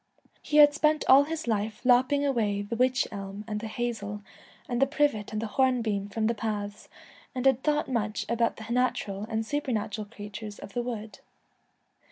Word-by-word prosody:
He 300 - 0
had 290 -1 +8
spent 305 0 +2
all 275 +2 +8
his 320 +1 -4
life 215 -1 -1
lopping 260 +3 +4
away 215 -7 0
the 205 +3 -4
witch 255 +1 +2
elm 200 0 -7
and 210 -1 -3
the 225 - -5
hazel 215 -3 -4 0.4
and 245 0 -1
the 270 - +5
privet 285 -8 0
and 215 - -2
the 225 - -2
horn 255 +2 +2
beam 205 -2 -2
from 220 +2 -1
the 230 - +2
paths, 210 -2 -4 0.5
and 255 0 -2
had 265 -1 +4
thought 300 +1 +1
much 215 -5 -1
about 235 0 +1
the 220 - -8
natural 215 -5 -1
and 220 0 -1
supernatural 220 -6 -2
creatures 205 +1 -8
of 200 - -10
the 245 - 0
wood. 225 -3 -6
225 Hz, 185 wpm, -28 LUFS, 210-260 Hz, 0.5 s, had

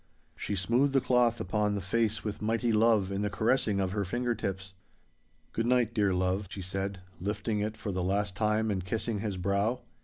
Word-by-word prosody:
She 100 - -3
smoothed 120 +9 +2
the 135 - +5
cloth 125 -2 +2
upon 105 +2 0
the - - -1
face 110 +4 0
with 105 -1 -4
mighty 115 +2 +1
love 105 -3 +3
in 100 +1 -1
the 105 - 0
caressing 110 +1 +1
of 95 -1 0
her 100 +1 -1
finger 120 +5 -1
tips. 95 -4 -4 0.8
'Good 115 +1 -1
night, 120 -2 +3
dear 105 -4 +2
love,' 95 +2 0
she 95 - -6
said, 95 +1 -3 0.2
lifting 105 +3 -2
it 105 +1 -2
for 105 - -4
the 95 -1 -2
last 100 +1 0
time 110 +1 +1
and 95 -2 -1
kissing 110 +2 -2
his 100 -2 -3
brow. 100 +6 0
105 Hz, 195 wpm, -30 LUFS, 95-115 Hz, 0.8 s, the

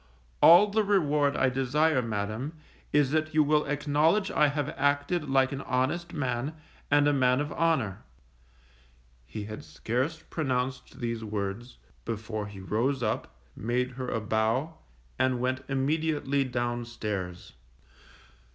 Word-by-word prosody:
All 175 +5 +9
the 220 +1 +2
reward 150 -8 +2
I 130 - +3
desire, 135 +3 +2
Madam, 110 +5 -3 0.4
is 145 -2 +3
that 155 0 0
you 155 - +6
will 150 +1 +2
acknowledge 150 +7 +1
I 150 - +4
have 145 0 -1
acted 145 +3 0
like 135 -1 +3
an 140 0 -4
honest 135 +8 -1
man, 130 +2 -2 0.3
and 145 0 +4
a 145 - +3
man 130 -1 +3
of 145 0 -2
honour._ 135 - +1 1.3
He 105 - -6
had 105 +1 -7
scarce 135 +8 -3
pronounced 130 -4 -2
these 115 -1 -2
words, 105 +3 -4 0.3
before 110 -1 -4
he 100 -1 -10
rose 120 +7 -1
up, 110 - -2 0.2
made 125 +4 -1
her 125 0 -5
a 115 - -1
bow, 110 +8 0 0.4
and 130 -1 +2
went 130 +1 -1
immediately 140 0 0
down 120 -1 -2
stairs. 100 -7 -5
130 Hz, 135 wpm, -28 LUFS, 115-150 Hz, 1.3 s, All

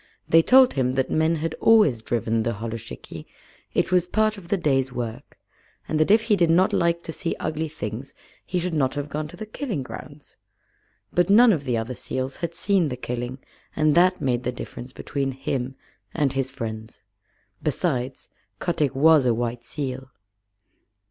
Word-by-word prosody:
They 165 - +6
told 255 +7 +6
him 130 -1 0
that 130 -1 0
men 160 +1 +2
had 160 0 -2
always 210 - +5
driven 115 -1 0
the 115 +1 -1
holluschickie 115 +1 -7 0.5
it - - +1
was 180 -1 +3
part 215 +3 +1
of 195 -4 -12
the 200 - +1
day's 135 -6 +1
work 115 -2 -6 0.5
and 155 - -1
that 155 - +3
if 220 +2 +5
he 225 -2 +3
did 175 -4 +2
not 180 +3 +4
like 170 0 +1
to - - -5
see 165 +1 -3
ugly 160 +1 -2
things 135 -3 -6 0.3
he 180 - -3
should 175 0 -2
not 135 -3 +1
have 145 0 -3
gone 150 +1 -3
to - - -12
the 215 - -6
killing 215 - -4
grounds. 145 +2 -11 0.8
But 180 +2 +2
none 225 +2 +7
of 145 -5 -3
the 125 -3 0
other 115 +3 -3
seals 130 +2 -4
had 170 -1 -4
seen 185 -4 +2
the 125 - -4
killing, 125 +1 -4 0.4
and 155 -1 +3
that 185 +2 +4
made 125 -2 0
the 125 - -2
difference 125 0 -8
between 135 0 -3
him 130 -1 -3 0.4
and 145 -4 +1
his 135 -1 -1
friends. 110 -4 -7 0.6
Besides, 135 -4 -2 0.3
Kotick 150 -6 -1
was 150 -1 +5
a 120 - +3
white 120 0 -3
seal. 130 0 -5
145 Hz, 180 wpm, -24 LUFS, 125-170 Hz, 0.8 s, none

